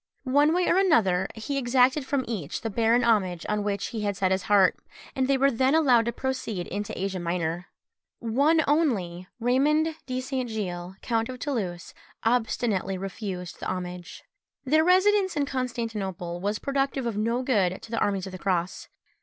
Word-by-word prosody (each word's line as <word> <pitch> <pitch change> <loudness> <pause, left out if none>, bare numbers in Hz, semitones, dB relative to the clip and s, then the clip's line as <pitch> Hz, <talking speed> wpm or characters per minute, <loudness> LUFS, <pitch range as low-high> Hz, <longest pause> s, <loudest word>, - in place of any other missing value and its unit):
One 285 +3 +3
way 355 +2 +1
or 345 - +3
another 215 - +3
he 275 +6 -3
exacted 260 +2 +2
from 270 -3 0
each 190 -10 -4
the 225 - -3
barren 230 +3 +3
homage 190 -7 +1
on 210 -1 -1
which 200 -1 -2
he 225 - -4
had 205 -2 -1
set 190 0 +1
his 190 0 +1
heart, 195 -3 +5 0.4
and 260 -1 +1
they 275 0 +3
were 275 +1 +3
then 260 +4 +2
allowed 255 -8 +4
to 235 - 0
proceed 235 -7 -3
into 205 +1 -5
Asia 190 0 -2
Minor. 170 0 -2 0.5
One 285 +8 +2
only, 200 - 0
Raymond 295 +7 +2
de 255 0 -2
St. 255 -1 -3
Gilles 185 -4 -4
count 230 -1 0
of 255 - -6
Toulouse, 200 - -4 0.3
obstinately 225 -5 0
refused 190 -2 -6
the - - -5
homage. 180 -1 -6 0.4
Wilken. 260 - -6
Their 310 +1 +5
residence 375 0 +3
in 285 - +2
Constantinople 220 -9 -3
was 205 +2 -1
productive 275 0 -1
of 230 -3 -2
no 230 +4 0
good 195 -8 +1
to 230 - -11
the 230 - 0
armies 195 -2 0
of 190 - -7
the 185 - -8
cross. 180 -1 -2
230 Hz, 180 wpm, -26 LUFS, 190-265 Hz, 0.5 s, heart